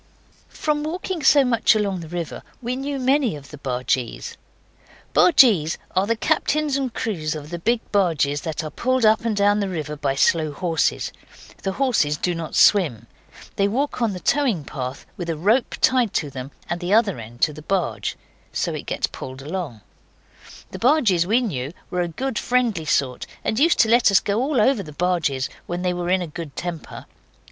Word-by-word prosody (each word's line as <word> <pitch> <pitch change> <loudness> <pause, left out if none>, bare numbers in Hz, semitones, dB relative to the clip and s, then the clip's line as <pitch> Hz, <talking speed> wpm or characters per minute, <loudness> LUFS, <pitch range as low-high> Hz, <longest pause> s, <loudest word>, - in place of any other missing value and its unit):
From 300 -1 -1
walking 340 +2 -3
so 285 -2 +6
much 230 -3 +3
along 200 -3 0
the 165 - -8
river 170 0 -5 0.2
we 245 0 -3
knew 275 +2 -3
many 265 - +2
of 140 -1 -12
the 150 - -10
bargees. 125 -2 -2 0.8
Bargees 210 - +5 0.2
are 190 +2 +2
the 230 - +2
captains 305 +2 +1
and 270 -3 -1
crews 165 -10 -2
of 150 +1 -8
the 175 - -4
big 230 +6 +1
barges 155 -8 +1
that 160 -1 -4
are 155 - -5
pulled 255 -1 +1
up 215 0 +5
and 220 -3 0
down 205 +1 +3
the 200 -2 -1
river 155 -4 -4
by 140 -2 -1
slow 155 +1 +2
horses. 165 +2 0 0.5
The 195 - -2
horses 215 - +1
do 180 - -1
not 165 -2 -5
swim. 145 - +4 0.5
They 200 - +3
walk 260 +5 -1
on 225 -4 +1
the 180 - -6
towing 245 - +1
path, 130 -1 -6
with 175 -2 -5
a 165 - -2
rope 215 - +2
tied 250 -5 +3
to 145 -3 -1
them, 130 0 -6 0.2
and 175 - -2
the 180 +3 +1
other 210 - +2
end 115 +2 -11
to 150 - +3
the 155 - -10
barge. 180 +1 -2 0.3
So - - -1
it - - -6
gets - - 0
pulled 130 +1 -8
along. 155 - -5 0.9
The - - -7
bargees 230 - +3
we 230 +5 +3
knew 145 - -3 0.2
were 180 - 0
a 175 - 0
good 250 +8 -3
friendly 240 -10 0
sort, 135 -4 0 0.2
and 220 - 0
used 330 +4 +4
to - - +5
let 235 +1 +5
us 200 - +5
go 205 +3 -1
all 270 -1 +1
over 225 +1 +3
the 155 -5 -10
barges 155 -6 0 0.2
when 175 +1 -3
they 180 -1 +1
were 175 0 -3
in 185 0 +2
a - - -3
good 160 -3 -8
temper. 175 -3 -6
185 Hz, 195 wpm, -22 LUFS, 155-240 Hz, 0.9 s, so